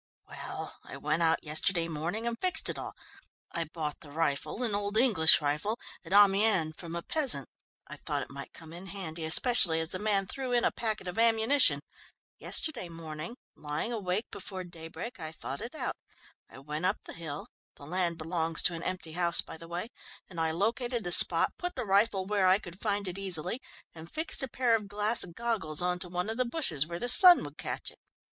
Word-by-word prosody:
"Well, - - -8
I - - -10
went 155 +3 -1
out 165 0 +2
yesterday 165 +3 +1
morning 170 +8 -4
and 235 0 -2
fixed 360 -3 +3
it - - -3
all. - - -7 0.6
I 165 - -2
bought 155 -1 -5
the 150 - -12
rifle, 155 - -2
an 225 -4 -1
old 205 +1 -2
English 210 -12 +5
rifle, 150 +10 -2 0.2
at 170 - -13
Amiens 200 -4 +4
from 170 0 -8
a 170 - -5
peasant. 260 - +1 0.4
I - - -10
thought - - -3
it - - -13
might 140 +1 -9
come 160 0 -13
in 180 +3 -10
handy, 170 -4 -6
especially 170 -1 +8
as 160 0 -3
the 185 - -5
man 205 -2 +1
threw 255 +5 -5
in 240 - +2
a - - +2
packet 220 -4 -4
of 180 +4 -4
ammunition. 225 - +4 0.6
Yesterday 250 - -2
morning, 165 +5 -8 0.2
lying 150 +10 -4
awake 205 0 -2
before 190 -1 -7
daybreak, 175 +6 -9
I 155 -1 -6
thought 140 -3 -6
it 240 +6 -8
out. - - -4 0.5
I - - -14
went 150 +6 -3
up 195 - -2
to - - -11
the - - -11
hill 150 -3 -7 0.3
the 140 - -13
land 175 +1 -1
belongs 165 0 -1
to 180 - +3
an 165 - -6
empty 180 -3 -4
house, 170 +1 +2
by - - -10
the 165 +1 -12
way 175 +6 -5 0.4
and 170 -3 -6
I 160 - +1
located 230 +7 -2
the 175 - -3
spot, - - +4
put 355 -1 -4
the 250 - -4
rifle 195 -1 +2
where 200 -1 +1
I 185 +1 +5
could 185 -2 -12
find 205 -2 -1
it 180 +1 -5
easily, 185 - +1 0.3
and 165 0 -12
fixed 315 +1 +2
a 265 - 0
pair 245 -1 0
of 210 -2 -4
glass 210 +3 +1
goggles 180 -4 -1
on 180 0 -1
to 180 - -2
one 180 +2 -3
of 220 +1 -4
the 255 - +1
bushes, 235 - +1
where 170 0 -5
the 245 - -3
sun 350 +9 +8
would - - -10
catch - - -5
it. - - -22
185 Hz, 210 wpm, -29 LUFS, 165-220 Hz, 0.6 s, especially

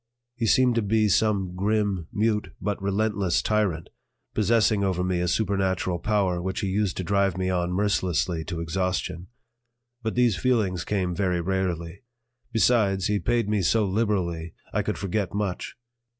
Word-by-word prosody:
He 120 -2 -2
seemed 125 +2 +4
to 115 - +1
be 110 +1 +2
some 100 -2 +1
grim, 100 -3 0
mute, 105 +1 0
but 105 -2 -3
relentless 100 -2 +1
tyrant, 100 -7 0 0.4
possessing 110 -1 +2
over 95 -2 0
me 90 -1 0
a 90 - 0
supernatural 95 -2 0
power 95 -2 0
which 95 +1 -3
he 100 - -1
used 100 -1 0
to 95 - -2
drive 100 0 +1
me 95 0 0
on 90 -1 0
mercilessly 90 -4 0
to 85 -1 -4
exhaustion. 90 +1 -2 0.7
But 110 -2 -3
these 120 -5 +3
feelings 95 -6 +1
came 95 -4 -1
very 90 -1 0
rarely; 90 -1 -2 0.5
besides, 105 -5 +2
he 105 0 +1
paid 120 -1 0
me 105 -1 +1
so 105 +4 +2
liberally 95 -6 -1 0.2
I - - +2
could - - -2
forget 100 -1 -2
much. 100 -3 -3
95 Hz, 155 wpm, -25 LUFS, 90-105 Hz, 0.7 s, seemed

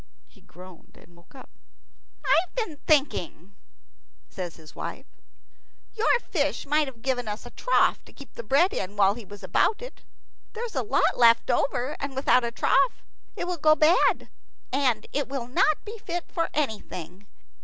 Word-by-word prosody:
He - - -24
groaned 180 0 -15
and 175 - -20
woke 170 +9 -22
up. 260 - -13 0.7
"I've 345 +3 +2
been 440 -11 -3
thinking," 235 - +1 0.8
says 180 -3 -6
his 155 -2 -15
wife, - - -6 0.9
"your 460 +2 +2
fish 295 -9 -2
might 300 +1 +2
have 235 -4 -11
given 250 -3 -1
us 210 +1 -5
a - - -10
trough - - +2
to - - -16
keep 280 - -14
the - - -6
bread 280 - +3
in 195 +2 -4
while 200 -1 +4
he 235 +1 -9
was 205 +1 -12
about 440 - +2
it. - - -10 0.5
There 455 +2 -4
is 455 - -8
a - - 0
lot 415 - +1
left 230 -1 +5
over, 275 +1 0
and 280 -1 -5
without 260 -2 +3
a 235 - -1
trough 245 - +1 0.3
it - - -3
will 355 0 -3
go 310 0 +5
bad, 310 +4 +3 0.5
and 255 -6 +1 0.2
not 270 +2 0
be 435 +1 -8
fit 350 -3 -5
for 335 - -1
anything. 205 - -4
270 Hz, 165 wpm, -26 LUFS, 210-315 Hz, 0.9 s, left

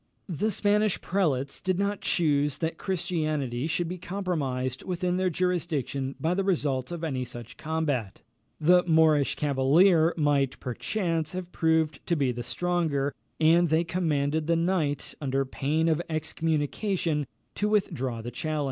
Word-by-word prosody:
The 190 +6 0
Spanish 210 0 +2
prelates 145 -8 -1
did 185 -1 0
not 200 +1 -1
choose 145 -4 +1
that 165 0 -3
Christianity 155 -8 -1
should 170 +1 -1
be 180 +2 -5
compromised 145 -10 -2
within 180 -1 -1
their 185 0 +1
jurisdiction 155 -7 -1
by 165 +2 +1
the 195 +2 0
result 145 -8 0
of 170 -1 -5
any 135 -5 -1
such 120 -1 -8
combat; 145 -10 -2 0.4
the 180 +3 +5
Moorish 160 -3 +4
cavalier 155 +5 +4
might, 145 -3 +1
perchance, 165 - -2
have 180 -1 -5
proved 160 -2 +1
to 170 - +2
be 140 -5 +1
the 120 0 -5
stronger, 145 +1 -1 0.3
and 165 +2 +5
they 160 +2 +3
commanded 155 -3 0
the 170 - +3
knight, 165 -5 0
under 135 -1 0
pain 150 +5 0
of 160 0 +2
excommunication, 160 - -1 0.3
to 210 - -1
withdraw 130 - -1
the 120 - -5
challenge. 155 +5 -2
160 Hz, 145 wpm, -27 LUFS, 140-175 Hz, 0.4 s, the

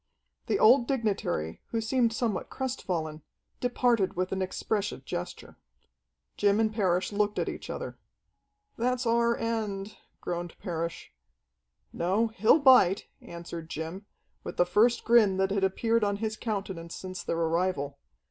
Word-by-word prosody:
The - - +2
old 240 +2 +6
dignitary, 205 - -1
who 230 - -2
seemed 230 +1 +1
somewhat 225 -3 -2
crestfallen, 170 -12 -3 0.4
departed 245 -5 +1
with 185 +1 -1
an 190 - -1
expressive 195 -4 -2
gesture. 90 - -6 0.8
Jim 205 +1 +3
and 220 -1 +2
Parrish 185 -4 +1
looked 205 0 0
at - - 0
each - - -6
other. - - -6 0.8
"That's 250 +1 0
our 235 0 +2
end," 215 -3 -3 0.2
groaned 175 -1 -4
Parrish. 170 -3 -5 0.8
"No, 195 +7 +1
he'll 220 +4 +4
bite," 255 - +5
answered 170 -1 -8
Jim, 165 +7 -6 0.4
with - - -7
the 175 - +4
first 225 +7 +3
grin 220 -5 +5
that 190 0 +1
had 200 -1 0
appeared 225 +4 +1
on 205 -1 +1
his 220 +1 -2
countenance 195 -7 -4
since 185 -1 -6
their 165 - -2
arrival. 165 -4 0
200 Hz, 140 wpm, -28 LUFS, 175-230 Hz, 0.8 s, old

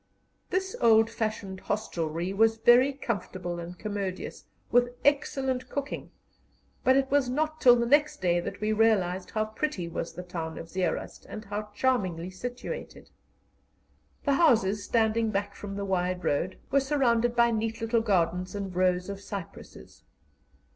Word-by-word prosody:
This 380 +1 -1
old 225 -1 +5
fashioned 215 -4 -3
hostelry 175 -4 -2
was 225 +2 +3
very 240 +4 +6
comfortable 185 -9 -4
and 175 +1 -7
commodious, 200 -3 -4 0.3
with 245 0 +3
excellent 265 -3 +1
cooking, 280 0 -4 0.7
but 260 +1 +5
it 270 -1 +1
was 280 -3 +3
not 310 +4 -1
till 245 -1 +8
the 235 0 +1
next 290 +4 +3
day 175 -2 +2
that 195 +3 -5
we 215 0 +1
realized 195 -5 +2
how 215 -1 0
pretty 215 - -3
was 170 - -4
the 180 - -7
town 165 -2 -5
of 165 - -8
Zeerust, 185 +1 -3
and 215 - -7
how 210 +1 -4
charmingly 185 -9 0
situated. 245 - -7 1.1
The 280 - +3
houses, 220 - +3
standing 225 -1 +2
back 200 -1 -2
from 200 -1 -7
the 200 0 -3
wide 185 -1 -1
road, 175 +6 0
were 275 - +5
surrounded 240 -4 +2
by 235 0 +4
neat 225 0 -2
little 225 0 +1
gardens 185 -3 0
and 195 -3 -4
rows 180 0 +2
of 200 0 -6
cypresses. 185 - -9
215 Hz, 150 wpm, -28 LUFS, 185-245 Hz, 1.1 s, till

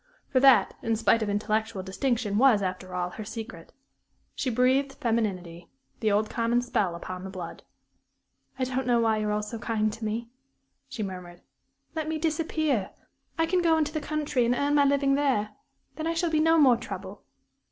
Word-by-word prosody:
For 260 - +3
that, 255 -6 +6
in 225 0 0
spite 225 +1 +3
of 215 - -1
intellectual 215 0 -1
distinction, 215 +1 -1
was, 240 -6 +5
after 185 0 -4
all, 180 0 -2
her 215 - -7
secret. 220 -5 -8 0.6
She 265 - -2
breathed 260 +3 +2
femininity 205 - -2 0.3
the 220 -2 +1
old 210 +1 +2
common 235 +2 0
spell 220 -8 0
upon 180 +1 -7
the 190 - -6
blood. 185 -3 -7 1.0
"I 265 - -1
don't 255 0 -2
know 240 -1 +3
why 225 -1 +2
you're 210 -1 -1
all 210 0 -1
so 220 +2 -6
kind 215 -2 0
to 225 +1 -9
me," 230 +2 -3 0.6
she 220 - -4
murmured. 180 -2 -8 0.5
"Let 315 -1 -3
me 320 - -1
disappear. 310 - 0 0.5
I 325 - +3
can 360 +2 +1
go 330 -2 +3
into 305 -1 0
the 310 - -2
country 295 -4 -1
and 240 +1 +2
earn 285 +3 0
my 290 -1 +5
living 280 0 +2
there. 270 -7 +1 0.5
Then 315 0 -3
I 335 - -1
shall 330 0 0
be 310 - +2
no 325 +1 +4
more 260 -6 +6
trouble." 195 -3 -8
230 Hz, 185 wpm, -27 LUFS, 205-280 Hz, 1.0 s, that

